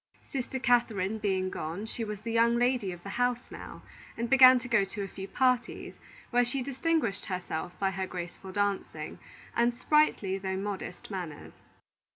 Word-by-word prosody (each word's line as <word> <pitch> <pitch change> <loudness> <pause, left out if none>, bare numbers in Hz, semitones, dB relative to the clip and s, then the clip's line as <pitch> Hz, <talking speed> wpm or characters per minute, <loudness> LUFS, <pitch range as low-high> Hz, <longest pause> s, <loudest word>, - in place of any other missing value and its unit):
Sister 265 0 -2
Catherine 225 -5 +2
being 190 -3 0
gone, 165 +7 -4
she 230 +1 -4
was 210 -2 -5
the 230 +1 -4
young 230 +1 +4
lady 245 -5 +2
of 175 -1 -9
the 200 - -6
house 245 0 0
now, - - -9 0.3
and 235 +2 -2
began 260 -1 +9
to 245 0 -5
go 230 -4 +4
to 200 +1 -5
a - - -4
few 195 0 -7
parties, 250 0 0 0.4
where 245 0 +4
she 255 +2 -1
distinguished 275 -5 0
herself 180 -3 -4
by 195 -1 +1
her 190 0 -3
graceful 180 +1 -7
dancing, 195 -6 -2 0.4
and 235 +1 +4
sprightly 245 -8 +2
though 190 0 -2
modest 195 -1 -5
manners. 175 -6 -6
210 Hz, 170 wpm, -30 LUFS, 190-245 Hz, 0.4 s, began